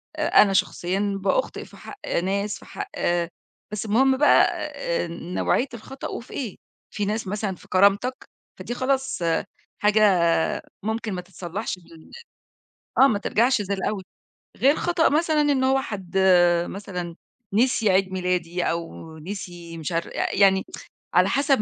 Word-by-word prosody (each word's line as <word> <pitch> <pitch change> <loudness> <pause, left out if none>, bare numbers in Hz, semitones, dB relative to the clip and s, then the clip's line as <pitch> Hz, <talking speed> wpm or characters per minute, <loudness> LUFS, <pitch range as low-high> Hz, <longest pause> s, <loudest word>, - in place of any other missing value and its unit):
آآ، 310 -1 0
أنا 200 -2 +3
شخصيًا 195 +2 0
بأخطئ - - 0
في - - -16
حق 410 - -10 0.3
ناس 200 +2 -1
في - - -15
حق - - -7 0.8
بس 210 +1 -3
المهم 260 +5 +3
بقى 295 - +6 0.3
آآ، - - -2
نوعية 175 +9 -1
الخطأ 260 +4 -7
وفي 235 - -8
إيه، 240 -9 -4 0.4
في 205 - -1
ناس 215 0 -2
مثلًا 200 -1 -2
في - - -18
كرامتك 200 +7 +2 0.3
فدي 240 - -4
خلاص 270 +1 -1 0.6
حاجة 210 +1 +3 0.8
ممكن 220 0 -2
ما 180 - -3
تتصلّحش 185 +2 -5
من 165 -2 -17 0.9
آه، - - +7
ما 210 -6 +1
ترجعش 235 +2 +2
زي 200 0 -2
الأول 195 +1 -2 0.6
غير 280 +3 +4
خطأ 345 -1 +2
مثلًا 310 0 +2
إن 285 -3 +2
هو 265 +1 +3
حد 195 -5 -7
آآ، 175 -2 +4
مثلًا 180 -4 -6 0.4
نسي 225 -1 +3
عيد 190 0 +2
ميلادي 180 -1 -1
أو 165 -1 -4
نسي 175 -1 -7
مش 160 +2 -4
عارف 165 0 -1
يعني 190 -1 +3 0.5
على 180 +2 +4
حسب 275 -2 +2
200 Hz, 145 wpm, -24 LUFS, 180-255 Hz, 0.9 s, آه